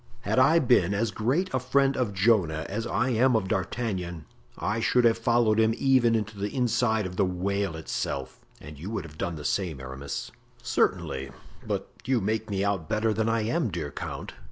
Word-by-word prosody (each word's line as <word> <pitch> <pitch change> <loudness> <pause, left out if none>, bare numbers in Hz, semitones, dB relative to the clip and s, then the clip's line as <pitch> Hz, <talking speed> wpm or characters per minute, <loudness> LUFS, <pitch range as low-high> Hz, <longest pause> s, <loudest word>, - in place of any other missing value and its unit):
"Had 125 - +1
I 150 +6 +6
been 120 - +3
as 110 +2 0
great 135 - 0
a 130 - +2
friend 135 +2 +2
of 125 -5 0
Jonah 95 -6 +2
as 115 +4 -3
I 125 +2 0
am 125 +1 +3
of 105 -4 +1
D'Artagnan 95 -4 -2 0.3
I 105 +2 -1
should 115 +2 +3
have 115 -1 +5
followed 115 -1 +3
him 110 0 +3
even 130 -4 +4
into 105 -2 -3
the 100 +1 -1
inside 120 -3 +1
of 90 0 -6
the 100 - +3
whale 95 0 -1
itself; 70 -4 -4 0.2
and 75 0 -11
you 90 +6 -6
would 105 -4 -3
have 80 -1 -12
done 85 - -2
the 75 -2 -8
same, 85 -7 -1
Aramis." 65 +2 -6 0.3
"Certainly—but 65 0 -2 0.2
you 130 -1 +2
make 110 +2 -2
me 100 -1 -1
out 95 -6 -1
better 110 0 +1
than 110 +1 0
I 115 0 +1
am, 120 +4 0
dear 80 -5 -4
count. - - -6
110 Hz, 190 wpm, -27 LUFS, 90-120 Hz, 0.3 s, I